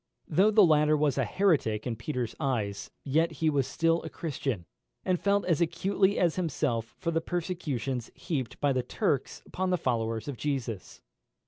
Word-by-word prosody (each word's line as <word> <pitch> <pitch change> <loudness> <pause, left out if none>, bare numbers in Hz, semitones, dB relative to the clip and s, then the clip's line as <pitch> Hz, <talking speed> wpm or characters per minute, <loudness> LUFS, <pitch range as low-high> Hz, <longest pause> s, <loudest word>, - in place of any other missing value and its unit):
Though 195 +4 +4
the 215 -2 +6
latter 155 -1 +4
was 145 -2 +1
a 130 - +2
heretic 125 - +1
in 120 -2 -2
Peter's 120 0 -3
eyes, 110 -9 -2
yet 160 +4 +1
he 155 +1 +1
was 140 -3 +1
still 165 0 +1
a 160 - -6
Christian, 135 - -3 0.4
and 180 -2 +1
felt 200 0 +2
as 170 -3 +1
acutely 190 +4 +2
as 175 -2 +2
himself 135 -9 -1
for 170 - -2
the 165 0 +1
persecutions 150 - -3
heaped 140 - -3
by 145 -1 +2
the 130 - +1
Turks - - -1
upon 185 0 -2
the 180 - +2
followers 115 -5 -1
of 140 -4 -4
Jesus. 125 -9 -4
150 Hz, 175 wpm, -29 LUFS, 125-170 Hz, 0.4 s, the